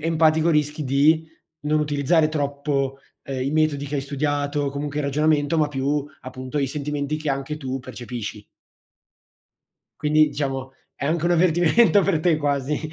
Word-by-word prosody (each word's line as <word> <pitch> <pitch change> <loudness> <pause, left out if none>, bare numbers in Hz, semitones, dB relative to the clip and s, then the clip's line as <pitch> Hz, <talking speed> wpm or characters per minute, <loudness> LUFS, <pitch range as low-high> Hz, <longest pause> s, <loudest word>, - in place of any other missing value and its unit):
empatico, 160 0 +3
rischi 150 -1 0
di 150 +4 +3 0.3
non 150 +1 +1
utilizzare 150 +2 +2
troppo, 140 -2 -2 0.2
ehm, 135 -2 -5
i 135 - -1
metodi 155 -2 +1
che 145 - -5
hai 140 - -1
studiato 145 +1 -1
o - - 0
comunque 145 +1 -4
il 150 - -1
ragionamento, 150 +2 +1
ma 150 -1 +2
più 140 +1 -1 0.2
appunto 130 +2 -6
i 140 - +1
sentimenti 145 +1 -3
che 155 -2 -3
anche 140 +2 -3
tu 135 -2 -4
percepisci. 120 -4 -7 1.6
Quindi 155 0 +4
diciamo 135 -2 -3 0.2
è 140 - -4
anche 165 +2 0
un 175 - +3
avvertimento 175 +5 +4
per 185 -6 +1
te 165 -1 +3
quasi. 145 -1 -1
145 Hz, 160 wpm, -23 LUFS, 140-155 Hz, 1.6 s, Quindi